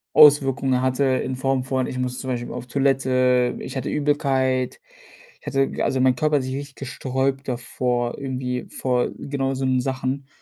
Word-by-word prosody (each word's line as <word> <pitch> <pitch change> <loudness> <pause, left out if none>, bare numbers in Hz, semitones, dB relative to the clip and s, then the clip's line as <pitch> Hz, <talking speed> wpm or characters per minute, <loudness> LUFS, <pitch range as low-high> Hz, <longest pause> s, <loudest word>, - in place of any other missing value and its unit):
Auswirkungen 135 -3 +5
hatte 130 +1 +1
in 130 -1 0
Form 130 0 0
von: 130 0 -1
Ich 130 - -5
muss 125 0 -2
zum 130 - -5
Beispiel 120 -1 -3
auf - - -6
Toilette, 130 -2 +2
ich 135 - -6
hatte 130 - -3
Übelkeit, 135 -3 0 0.6
ich - - -23
hatte 135 0 +1
g - - -5
also 130 - +1
mein 130 -1 +4
Körper 150 +2 +2
hat 135 - -1
sich 130 +1 -3
richtig 140 -1 -7
gesträubt 135 0 -2
davor, 120 -1 -1
irgendwie 125 -2 -3
vor 125 -2 0
genau 135 -1 -2
so 130 0 -2
'nen 130 -1 +2
Sachen 130 +1 -3
130 Hz, 180 wpm, -23 LUFS, 125-135 Hz, 0.6 s, Auswirkungen